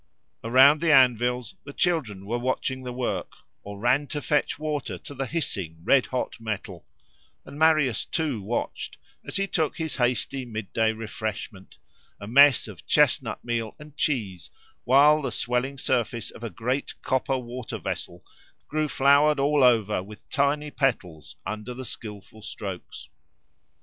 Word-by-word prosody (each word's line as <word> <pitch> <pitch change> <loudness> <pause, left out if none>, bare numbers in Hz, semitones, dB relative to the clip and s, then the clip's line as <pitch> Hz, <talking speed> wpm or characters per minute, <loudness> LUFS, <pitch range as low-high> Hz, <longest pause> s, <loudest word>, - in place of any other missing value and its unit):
Around 135 +6 +6
the 170 -1 +3
anvils 125 -3 +3
the 140 - -9
children 130 - -1
were 120 +4 -2
watching 130 +1 -2
the 125 -1 -6
work, 120 -7 -3 0.3
or 100 0 -8
ran 130 +6 +2
to 150 - -3
fetch 150 0 0
water 150 -2 -3
to - - -10
the 135 -1 -3
hissing, 95 - -3
red 135 +5 +4
hot 130 -2 -3
metal; 105 -6 -6 0.6
and 140 +2 -10
Marius 155 -7 +3
too 150 -9 -2
watched, 110 +5 -4 0.3
as - - -5
he 195 - +2
took 160 -6 -1
his 160 -2 -3
hasty 125 +1 0
mid 110 -4 -7
day 110 -1 +3
refreshment, 110 -3 -6 0.4
a - - -8
mess 135 +4 +6
of 100 -7 -12
chestnut - - +2
meal 115 -2 -2
and 150 -1 -13
cheese, 105 - -2 0.4
while 145 +4 +6
the 135 - -3
swelling 125 +3 -1
surface 120 -4 -1
of 115 - -13
a 115 - -3
great 125 - -3
copper 130 0 0
water 125 -1 -6
vessel 85 0 -5 0.4
grew 155 0 0
flowered 140 +2 +4
all 145 0 +3
over 110 -6 +3
with 105 +3 -13
tiny 145 +1 +1
petals 90 - -2
under 110 +3 -5
the 130 +1 -7
skilful 105 -1 -8
strokes. 100 -4 -7
125 Hz, 150 wpm, -26 LUFS, 110-140 Hz, 0.6 s, Around